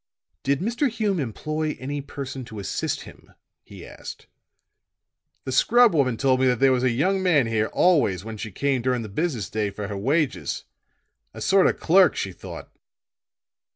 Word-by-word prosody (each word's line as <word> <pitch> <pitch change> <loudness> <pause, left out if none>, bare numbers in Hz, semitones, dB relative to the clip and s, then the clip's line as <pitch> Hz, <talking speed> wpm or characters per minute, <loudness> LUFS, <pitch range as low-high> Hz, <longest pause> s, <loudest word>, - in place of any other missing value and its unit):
"Did 140 +3 0
Mr. 240 +7 0
Hume 210 -5 -1
employ 155 +5 -3
any 140 +2 -4
person 135 -2 -7
to 110 - -10
assist 100 - -3
him?" - - -15 0.3
he - - -12
asked. - - -10 1.2
"The 130 - -5
scrub 235 - +5
woman 130 -7 +1
told 130 0 +2
me 130 - +3
that 125 -3 +1
there 135 -1 +5
was 125 -1 +2
a 130 - +3
young 185 +11 +1
man 165 -8 +3
here 110 -1 0
always 125 - +2
when 110 -1 -6
she 110 0 -6
came 135 +5 0
during 125 -1 0
the 110 - -7
business 125 - -2
day 105 -1 -2
for 100 +1 -6
her 105 - -4
wages. 145 +7 -1 0.7
A - - -8
sort 195 -1 +4
of - - -1
clerk, 180 -1 +5
she 95 - -3
thought." - - -10
135 Hz, 175 wpm, -24 LUFS, 115-165 Hz, 1.2 s, scrub